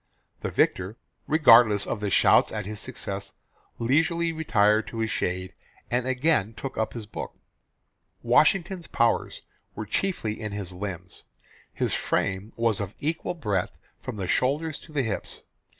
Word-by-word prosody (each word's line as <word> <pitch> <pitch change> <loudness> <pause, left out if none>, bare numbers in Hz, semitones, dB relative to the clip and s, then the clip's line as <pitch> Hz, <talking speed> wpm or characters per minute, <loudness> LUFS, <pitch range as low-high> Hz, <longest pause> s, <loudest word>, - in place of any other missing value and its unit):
The - - -3
victor, 95 +5 +1 0.3
regardless 115 -9 +6
of 105 -1 -2
shouts - - +5
at - - -4
his 105 +1 -5
success, 100 -5 -5 0.4
leisurely 165 +7 +2
retired 110 -9 +2
to 115 - -7
his 110 0 -1
shade, 90 0 -2 0.4
and 125 +1 0
again 130 -5 +1
took 135 - -6
up 110 0 -1
his 115 -3 -6
book. 105 - -7 0.9
Washington's 175 +2 +3
powers 115 0 0 0.3
were 110 - -4
chiefly 110 - -1
in 105 -2 -4
his 100 -3 -4
limbs. 90 -1 -6 0.5
His - - -1
frame 100 +3 -1
was 115 -2 +1
of 100 0 -5
equal 160 +3 -2
breadth 105 - -2 0.2
from - - -6
the 95 -2 -3
shoulders 145 - 0
to 160 - -15
the 145 -3 0
hips. 110 -4 -4
110 Hz, 145 wpm, -26 LUFS, 100-145 Hz, 0.9 s, regardless